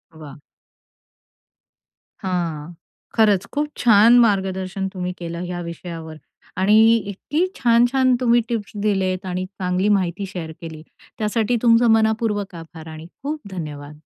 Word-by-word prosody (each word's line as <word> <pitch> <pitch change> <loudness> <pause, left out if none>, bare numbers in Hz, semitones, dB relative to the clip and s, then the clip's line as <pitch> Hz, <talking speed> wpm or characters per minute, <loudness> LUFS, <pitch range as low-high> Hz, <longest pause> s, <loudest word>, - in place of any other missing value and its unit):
वाह! 150 -3 -11 1.8
हां, 170 -4 -3 0.4
खरंच 210 -4 +3
खूप 295 +1 0
छान 230 +1 +6
मार्गदर्शन 190 -3 0
तुम्ही 180 -1 -4
केलं 170 0 -6
ह्या 175 0 -5
विषयावर 170 -1 -7 0.4
आणि 200 +3 +4 0.3
इतकी 295 - -1
छान-छान 245 +2 +3
तुम्ही 240 -1 +4
टिप्स 220 -4 -3
दिलेत 190 -2 0
आणि 185 0 -3
चांगली 185 +1 -1
माहिती 190 -1 0
शेअर 170 -4 -6
केली. 160 -2 -8 0.3
त्यासाठी 220 +2 0
तुमचं 235 0 +5
मनपूर्वक 220 -3 +1
आभार 165 -1 -11
आणि 155 +1 -9 0.2
खूप 300 +3 -3
धन्यवाद. 150 -4 -7
190 Hz, 120 wpm, -21 LUFS, 170-225 Hz, 1.8 s, छान